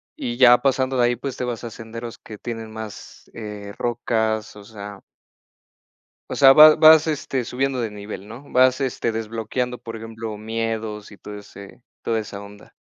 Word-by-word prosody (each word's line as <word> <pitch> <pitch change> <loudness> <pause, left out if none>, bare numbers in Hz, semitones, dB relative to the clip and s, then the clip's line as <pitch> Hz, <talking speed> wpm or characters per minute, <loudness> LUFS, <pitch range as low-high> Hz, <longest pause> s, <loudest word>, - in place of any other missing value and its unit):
Y 120 - -4
ya 120 -1 +8
pasando 130 -1 +1
de 120 - +4
ahí, 120 0 +1
pues, 130 +2 -5
te 125 - -2
vas 120 -2 -4
a 120 - -6
senderos 115 +1 -8
que 110 - -11
tienen 115 0 -6
más, 110 -2 -10
eh, 105 -2 -8
rocas, 110 -2 -1
o 105 - -12
sea 100 -1 -10 1.3
O - - -2
sea, 135 -1 +8
vas 155 +2 +9
vas 155 0 +7
este 140 -4 -2
subiendo 130 +2 -2
de 115 - -2
nivel, 105 -1 -8
¿no? 115 +5 -10
Vas 130 +1 +4
este 130 -3 -1
desbloqueando, 115 +3 -3
por 115 -1 -7
ejemplo, 110 -1 -7
miedos 110 -1 -4
y 100 - -13
todo 105 0 -9
ese 100 +2 -13 0.2
toda 115 -1 0
esa 105 -2 -7
onda. 100 0 -13
115 Hz, 180 wpm, -22 LUFS, 105-125 Hz, 1.3 s, vas